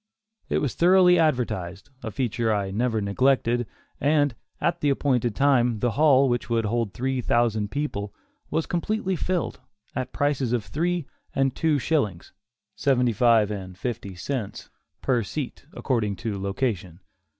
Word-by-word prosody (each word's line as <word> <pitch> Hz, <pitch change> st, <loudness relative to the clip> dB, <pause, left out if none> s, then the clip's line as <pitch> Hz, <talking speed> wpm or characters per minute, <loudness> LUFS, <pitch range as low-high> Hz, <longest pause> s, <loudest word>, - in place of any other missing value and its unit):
It -, -, +1 dB
was 140 Hz, -, -1 dB
thoroughly 180 Hz, 0 st, +5 dB
advertised 120 Hz, -, -1 dB
a 115 Hz, -, -4 dB
feature 120 Hz, -1 st, -1 dB
I 100 Hz, -2 st, -1 dB
never 110 Hz, +1 st, 0 dB
neglected 120 Hz, +3 st, +2 dB, 0.3 s
and, 145 Hz, -2 st, +2 dB, 0.3 s
at 170 Hz, -, 0 dB
the 145 Hz, -, +2 dB
appointed 125 Hz, -5 st, +1 dB
time, 125 Hz, -5 st, +3 dB
the 120 Hz, +3 st, 0 dB
hall, 140 Hz, +1 st, +5 dB
which 120 Hz, -1 st, -1 dB
would 115 Hz, -1 st, +1 dB
hold 115 Hz, -1 st, 0 dB
three 130 Hz, +5 st, -2 dB
thousand 110 Hz, -3 st, +1 dB
people, 105 Hz, -7 st, -3 dB, 0.4 s
was 160 Hz, -, 0 dB
completely 190 Hz, +2 st, -1 dB
filled, 180 Hz, 0 st, -2 dB, 0.4 s
at 130 Hz, -, -3 dB
prices 140 Hz, -4 st, 0 dB
of 115 Hz, -4 st, 0 dB
three 175 Hz, +1 st, -1 dB, 0.3 s
and 135 Hz, -1 st, +1 dB
two 160 Hz, -2 st, +2 dB
shillings, 120 Hz, -, -1 dB, 0.4 s
(seventy 125 Hz, -4 st, +2 dB
five 110 Hz, -2 st, +4 dB
and 95 Hz, -3 st, -6 dB
fifty 105 Hz, -4 st, -4 dB
cents,) 115 Hz, +2 st, -5 dB, 0.3 s
per 125 Hz, -3 st, +2 dB
seat, 135 Hz, +5 st, -5 dB
according 110 Hz, -6 st, -1 dB
to 105 Hz, -2 st, -4 dB
location. 95 Hz, -4 st, -2 dB
125 Hz, 145 wpm, -25 LUFS, 105-145 Hz, 0.4 s, thoroughly